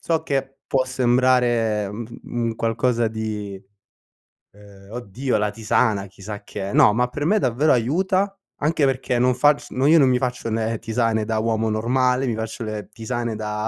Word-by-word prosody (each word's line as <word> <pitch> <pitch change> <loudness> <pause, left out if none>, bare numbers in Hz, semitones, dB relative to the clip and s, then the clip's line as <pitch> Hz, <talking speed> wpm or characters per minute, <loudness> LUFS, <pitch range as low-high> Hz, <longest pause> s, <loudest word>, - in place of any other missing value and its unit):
So 165 -1 0
che 135 -1 -3
può 130 -1 +1
sembrare, 120 -4 +2
mhmm, 115 +1 -6
f 115 - -11
un 115 -1 -2
qualcosa 115 +1 +1
di, 105 -3 -5 0.9
uhm: 100 -1 -17
"Oddio, 120 +2 -2
la 105 0 0
tisana, 105 -1 0
chissà 100 +2 -9
che 100 -1 -5
è." - - -6
No, 105 - +5
ma 125 +2 +1
per 145 +4 -4
me 215 +4 +3
davvero 135 - +2
aiuta, 185 - +1 0.3
anche 150 0 +1
perché 130 -2 0
non 125 +1 +3
facc 145 +2 +3
no 130 +2 0
io 160 +2 +6
non 135 - +5
mi 125 -1 +3
faccio 125 -2 -3
le 110 0 -1
tisane 115 -1 0
da 110 -1 -1
uomo 110 0 0
normale, 125 +4 +1
mi 115 - -1
faccio 110 +1 -5
le 110 -1 -5
tisane 115 +1 -4
da 105 0 -3
115 Hz, 180 wpm, -22 LUFS, 110-130 Hz, 0.9 s, io